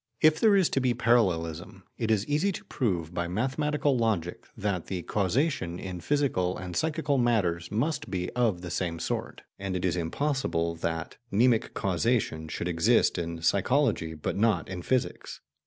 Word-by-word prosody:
If 155 0 +5
there 215 -2 +5
is 190 -4 +4
to - - +1
be 125 -2 +1
parallelism, 90 -10 +1
it 115 - -2
is 105 -2 +2
easy 155 +7 +1
to - - -8
prove 90 - -2
by 85 0 -1
mathematical 135 - 0
logic 100 -7 -1
that 100 -5 -2
the 90 -3 -3
causation 105 - 0
in 90 -1 -6
physical 125 -11 0
and 90 -1 -6
psychical 155 -3 0
matters 90 -9 +1
must 145 +10 -1
be 90 -2 -2
of 115 -8 +1
the 90 -2 -6
same 85 -2 -2
sort, - - -4 0.2
and 95 -1 -3
it 90 - -1
is 90 - +1
impossible 85 - -1
that 80 -1 -3
mnemic 115 +2 +2
causation 95 -4 0
should 80 +3 -4
exist 85 0 +3
in 85 -1 -4
psychology 100 - +2
but 75 - -3
not 100 -5 +1
in 90 -2 -5
physics. 130 +7 -2
100 Hz, 165 wpm, -28 LUFS, 85-130 Hz, 0.2 s, If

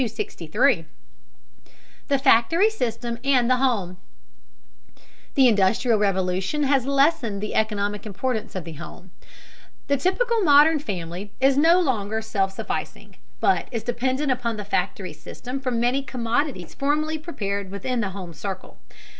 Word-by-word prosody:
263. 215 - 0 1.2
THE 280 - +2
FACTORY 280 - +4
SYSTEM 235 - -3
AND 260 -3 +3
THE 255 - +4
HOME. 210 -9 0 1.4
The 265 -2 +6
Industrial 220 +2 +3
Revolution 190 +6 0
has 270 -2 +2
lessened 275 -7 +2
the 210 +1 -4
economic 210 -1 -1
importance 220 +2 -3
of 185 - -3
the 165 0 -8
home. 170 +3 -11 0.8
The 280 - +3
typical 450 - +1
modern 300 -1 +6
family 190 - -6
is 270 +1 +4
no 330 +5 +5
longer 220 - 0
self 195 -3 0
sufficing, 195 - -6 0.2
but 385 - +2
is 230 -3 -3
dependent 260 +4 -1
upon 235 -3 -1
the 210 - -6
factory 205 - -2
system 255 +2 -7
for 265 -1 -2
many 245 +3 +1
commodities 245 - -2
formerly 305 +3 0
prepared 200 - -4
within 230 +5 -2
the 205 - -1
home 185 -3 -8
circle. 190 +4 -7
235 Hz, 135 wpm, -24 LUFS, 200-275 Hz, 1.4 s, The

